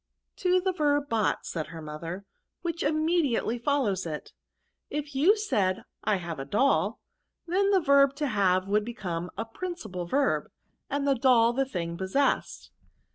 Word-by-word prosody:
*' - - -55
To 365 0 +3
the 375 +1 0
verb 290 -3 +1
bought," 220 -2 0
said 160 -3 -4
her 165 +1 -9
mother, 165 +5 -6 0.4
which 335 -1 -3
immediately 310 -6 +1
follows 235 -9 0
it. 150 -2 -6 0.6
If 295 0 -4
you 305 +10 +5
ssad 200 - 0 0.2
I 215 -1 +2
have 170 -5 -5
a - - -3
doll', 270 - +2 0.5
then 385 +4 +2
the 395 -1 +4
verb 280 -2 +5
to 295 - -2
have 190 -6 +2
Would 210 +1 +2
become 180 -7 -4
a 225 - -2
principal 225 - -6
verb, 275 +9 +1 0.4
and 285 0 -1
doU 250 -4 +4
the 270 +1 +2
thing 170 -3 -3
possessed." 190 +10 0
245 Hz, 155 wpm, -28 LUFS, 185-290 Hz, 0.6 s, you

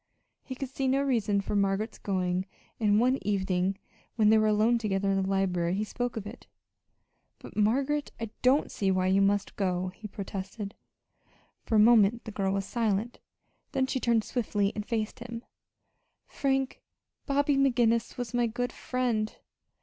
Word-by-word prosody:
He 260 - -7
could 265 0 -5
see 270 0 -2
no 270 +2 +2
reason 220 -7 +1
for 200 - -3
Margaret's 200 +2 0
going, 185 -1 -1 0.3
and 210 -2 +3
one 255 +3 +3
evening 190 -1 0 0.4
when 215 -2 +4
they 220 - +6
were 215 - +3
alone 215 +3 +3
together 195 -3 0
in 195 0 +1
the 190 - -2
library 180 -3 +1
he 205 - 0
spoke 245 +2 -3
of 210 - -4
it. 220 +4 -10 0.9
"But, - - -12
Margaret, 270 +8 +1
I 225 -2 -4
don't 260 +4 +3
see 195 - 0
why 185 -1 +2
you 190 +1 +3
must 200 0 +1
go," 185 -2 -1
he 210 +4 -9
protested. 200 +1 -6 0.9
For 225 - +1
a - - +6
moment 225 0 +5
the 220 - -6
girl 195 -2 -1
was 195 -1 -1
silent; 225 +1 -1 0.5
then 265 -2 +2
she 260 - -2
turned 235 -3 +2
swiftly 205 -5 0
and 210 - -4
faced 220 -1 -3
him. 235 0 -7 0.8
"Frank, 270 -1 -1 0.5
Bobby 285 0 +2
McGinnis 240 -4 +2
was 245 -1 -4
my 240 -1 +2
good 245 +2 -3
friend. 235 -4 -1
215 Hz, 165 wpm, -29 LUFS, 195-245 Hz, 0.9 s, they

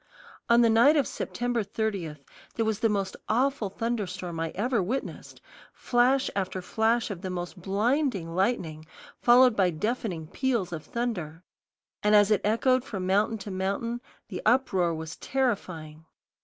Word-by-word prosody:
On 235 0 +6
the 230 - +5
night 240 +8 +6
of 280 - +3
September 240 -1 -2
30, 200 -6 -3 0.4
there 225 - 0
was 220 -2 -1
the 225 - +2
most 195 -2 -1
awful 250 -2 +1
thunderstorm 185 -6 -3
I 165 0 -1
ever 235 +2 +1
witnessed, 245 +9 -5 0.3
flash 255 +2 +2
after 190 -1 -2
flash 225 +5 0
of 180 -3 -6
the 190 - -4
most 180 +1 -5
blinding 205 - 0
lightning, 170 -6 -1 0.3
followed 245 0 +6
by 190 -3 +3
deafening 180 -1 -3
peals 230 - -1
of 155 -2 -5
thunder; 180 -9 -4 0.6
and 210 0 +4
as 205 0 +5
it 210 -2 +3
echoed 250 +4 +2
from 195 -8 -5
mountain 205 +4 +2
to 205 0 -7
mountain 200 +6 -2 0.3
the - - -5
uproar 215 -8 +2
was 160 0 -7
terrifying. 180 -12 -2
210 Hz, 150 wpm, -27 LUFS, 180-240 Hz, 0.6 s, On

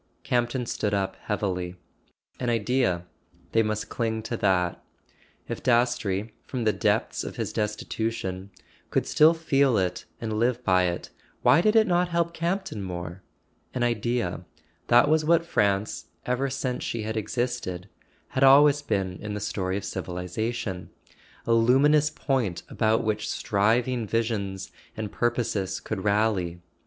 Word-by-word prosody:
Campton 120 0 0
stood 105 -2 -1
up 95 -1 -1
heavily. 90 -4 -2 0.6
An 125 - -1
Idea: 115 -6 +1 0.5
they 115 - +4
must 110 -1 -2
cling 110 -2 -2
to 115 +1 -3
that. 90 -4 +1 0.6
If - - -5
Dastrey, 120 -4 +1
from 125 -3 -4
the 110 -1 +3
depths - - 0
of - - -6
his - - -3
destitution, 105 -2 -3 0.4
could - - +1
still 155 +2 +5
feel 140 -6 +2
it 90 -2 -1
and 110 -2 -2
live 125 +1 +1
by 95 -4 +3
it, 85 -1 -3 0.3
why 170 - +6
did 215 +3 +3
it 220 -1 +6
not 180 -1 +2
help 170 0 0
Campton 170 - -2
more? 90 -1 -6 0.5
An 125 - 0
Idea: 120 -6 -1 0.4
that 120 +3 +6
was 155 +1 +3
what 165 +1 +3
France, 100 -8 0 0.2
ever 125 +2 0
since 130 -2 -3
she 115 -2 -3
had 110 +1 -3
existed, 110 -4 -2 0.4
had 135 - 0
always 145 +2 +7
been 95 -9 -1
in 105 0 -4
the - - -3
story 95 -2 -2
of 100 - -5
civilization; 90 +2 -4 0.6
a 115 - +2
luminous 140 +6 +4
point 125 - -1
about 110 -1 +1
which 105 -1 -1
striving 115 +3 +1
visions 100 -4 -2 0.3
and 110 -2 -4
purposes 115 -5 -1
could 100 -4 -4
rally. 100 -5 +1
110 Hz, 145 wpm, -26 LUFS, 100-125 Hz, 0.6 s, always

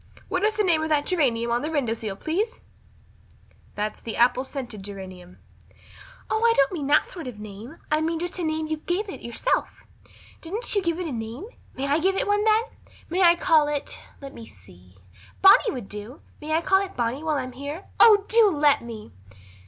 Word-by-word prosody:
What 370 -2 -1
is 430 0 +2
the 425 - +1
name 335 -5 +2
of 315 - -2
that 295 -2 +2
geranium 240 -10 +1
on 240 +1 +1
the 305 - -3
window 280 -8 0
sill, 220 -3 -5
please?" 390 - -2 1.1
"That's 210 +1 -3
the 225 - -6
apple 250 +2 +3
scented 255 -6 -7
geranium." 185 -2 -10 0.9
"Oh, 435 - -1
I 465 0 +5
don't 275 0 +4
mean 305 -7 -4
that 295 +2 +3
sort 335 -7 -7
of 250 - -6
a - - -15
name. 215 +8 -10
I 305 0 +2
mean 325 +1 -1
just 350 +2 -3
a - - -2
name 315 0 -1
you 315 0 -3
gave 355 +7 -2
it - - -8
yourself. 235 - -2 0.6
Didn't 415 +9 -2
you 405 - +2
give 340 -1 -1
it 365 - -3
a 320 - -4
name? 230 - -6 0.3
May 270 - -3
I 285 +3 +2
give 380 +4 +1
it - - 0
one 410 0 +1
then? 435 0 +4 0.5
May 365 +2 +1
I 345 -1 +7
call 315 -3 +3
it 295 -1 -4 0.2
let 275 -1 -9
me 230 -1 -11
see 90 -1 -18 0.5
Bonny 390 +4 +7
would 245 - -6
do 210 +7 -8 0.2
may 310 +1 -3
I 320 - +2
call 385 +3 +3
it 390 - -9
Bonny 240 +3 -1
while 310 -2 0
I'm 255 -1 -4
here? 285 +8 -7
Oh, 415 -3 +7
do 450 -2 +5
let 295 -4 +3
me!" 225 -2 -9
300 Hz, 210 wpm, -24 LUFS, 235-360 Hz, 1.1 s, I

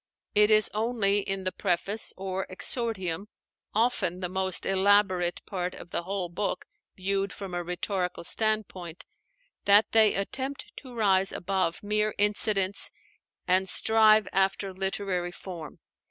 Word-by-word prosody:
It 210 0 +5
is 215 -1 +5
only 215 -2 +1
in 195 -1 -3
the 185 - -1
Preface, 195 +3 -1
or 190 0 -4
'Exordium,' 195 -3 -1 0.5
often 210 -6 +1
the 180 -1 -3
most 190 -1 -1
elaborate 190 -2 +2
part 180 -2 -4
of 175 - -12
the - - -1
whole 185 0 -3
book 190 +4 -3 0.3
viewed 195 +1 -1
from 195 -3 -8
a 175 0 -2
rhetorical 180 +1 -3
standpoint, 195 -5 -1 0.6
that 205 +1 +5
they 220 -2 +5
attempt 265 +8 -4
to 255 -3 -10
rise 195 -3 +2
above 185 -2 -2
mere 210 +1 0
incidents 205 -1 +2 0.6
and 185 +1 +3
strive 220 -1 +4
after 195 0 0
literary 190 -2 -2
form. 175 -4 -9
195 Hz, 130 wpm, -27 LUFS, 185-210 Hz, 0.6 s, It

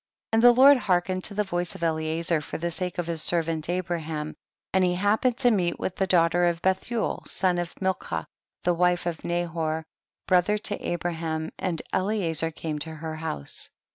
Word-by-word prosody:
37. - - +2
And 225 - +3
the 245 0 +7
Lord 280 +1 +9
hearkened 185 -3 0
to 205 - -4
the 210 - +2
voice 175 -2 -2
of - - -7
Eliezer, 160 0 0
for - - -6
the 170 +1 -2
sake 180 +1 -2
of 175 - -1
his 165 -1 -2
servant 165 -2 0
Abraham, 165 -4 -3 0.4
and 190 0 +4
he 180 -1 +2
hap 205 +4 +2
pened 250 -2 +2
to 245 -2 +4
meet 180 -5 +1
with 185 - -3
the 190 - 0
daughter 175 0 +4
of 170 -1 0
Bethuel, 190 +5 0
the - - -11
son 180 -2 +1
of 175 -1 -5
Milcah, 190 -1 -2 0.4
the 175 - +3
wife 180 0 +2
of 170 -3 -3
Nahor, 165 -2 -2 0.4
brother 185 +3 +3
to 205 -1 -3
Abraham, 165 -2 -2
and 175 -4 -2
Eliezer 185 -5 +1
came 155 -1 -4
to 160 +1 -4
her 160 0 -5
house. 75 - -4
175 Hz, 195 wpm, -26 LUFS, 160-190 Hz, 0.4 s, Lord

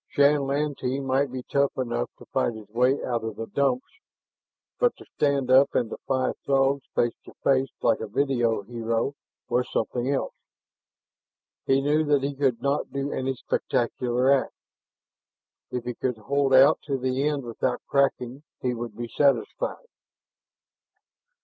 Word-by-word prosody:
Shann 140 0 +3
Lantee 140 -2 -1
might 135 0 0
be 130 -1 -5
tough 140 +1 0
enough 120 -2 -1
to - - -14
fight 115 - -1
his 110 -2 -10
way 125 +5 +2
out 120 -3 -1
of 110 -2 -4
the 115 - -5
Dumps, 135 - -1 0.8
but - - +2
to - - -13
stand 140 -3 0
up 135 +2 +5
and 120 -3 +1
defy 130 -1 -1
Throgs 135 0 +2
face 120 -1 +2
to - - -14
face 135 -1 +3
like 115 - +3
a 110 - -4
video 120 -3 +1
hero 115 +3 -2 0.3
was 125 +2 0
something 125 0 -1
else. 140 - -1 1.3
He 135 0 +4
knew 150 +3 +2
that 145 -2 +2
he 140 +1 -1
could 135 -4 0
not 140 +1 0
do 140 +1 -2
any 130 0 -2
spectacular 125 +1 0
act; 135 -4 +1 1.1
if 125 -1 -3
he 125 0 -3
could 125 0 -2
hold 140 +5 0
out 135 +4 +7
to 140 -2 0
the 130 +2 0
end 145 -2 -1
without 125 +1 -2
cracking 135 -1 0 0.2
he 125 -1 -1
would 115 -2 -6
be 120 0 -4
satisfied. 145 - 0
130 Hz, 155 wpm, -26 LUFS, 120-140 Hz, 1.3 s, out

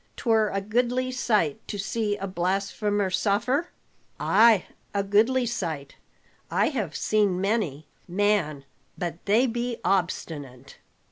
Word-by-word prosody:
'Twere 220 -3 +2
a 195 - -2
goodly 245 +4 0
sight 210 - +1
to 205 - -4
see 205 +1 -1
a 195 - -4
blasphemer 195 +2 -1
suffer?" 215 - +1 0.5
"Ay, 225 -3 +5 0.3
a 200 - +2
goodly 225 +6 +3
sight. 160 -12 -4 0.5
I - - +2
have 215 - -3
seen 205 -4 +1
many. 190 -8 -1 0.2
Man, 180 -7 0 0.3
but 175 -2 -4
they 220 +6 +4
be 240 0 -2
obstinate! 155 -8 -2
205 Hz, 120 wpm, -26 LUFS, 180-230 Hz, 0.5 s, Ay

